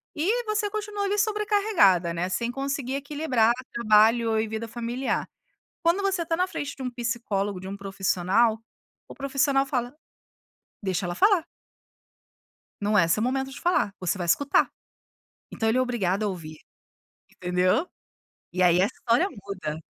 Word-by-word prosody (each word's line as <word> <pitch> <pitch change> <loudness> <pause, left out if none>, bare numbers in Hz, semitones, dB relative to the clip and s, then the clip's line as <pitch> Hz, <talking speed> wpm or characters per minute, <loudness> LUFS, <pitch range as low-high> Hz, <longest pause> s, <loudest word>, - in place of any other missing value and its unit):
e 415 +11 +1
você 430 -1 -1
continua 415 -1 -3
ali 405 +1 0
sobrecarregada, 405 - +3
né, 175 +2 -2
sem 235 +5 -1
conseguir 275 0 -3
equilibrar 280 -5 +1 0.2
trabalho 225 0 +4
e 220 - 0
vida 220 +1 -4
familiar, 240 +3 -2 0.6
quando 340 +4 +3
você 390 -3 0
está 330 0 -1
na 365 +2 +1
frente 290 -5 -5
de 270 - -10
um 250 - -2
psicólogo, 230 -5 -2
de 190 - -8
um 200 +1 -6
profissional, 195 +3 +1 0.5
o - - -10
profissional 275 0 +1
fala: 250 -1 -2 0.9
"Deixa 190 -1 -1
ela 175 - -3
falar". 380 - +4 1.4
"Não 210 +1 +1
é 170 -4 +5
seu 190 +6 +2
momento 265 +2 -1
de 270 - -9
falar, 345 - +1
você 180 +1 -1
vai 175 - -3
escutar". 280 +11 +3 0.8
Então 225 - -1
ele 230 +3 +2
é - - +4
obrigado 215 -6 0
a 210 - +1
ouvir, 160 -5 -6 0.7
entendeu? 180 - +1 0.7
E 185 0 +1
aí 175 +1 +5
a - - +5
história 240 - +1
muda. 185 - -6
235 Hz, 155 wpm, -26 LUFS, 195-290 Hz, 1.4 s, é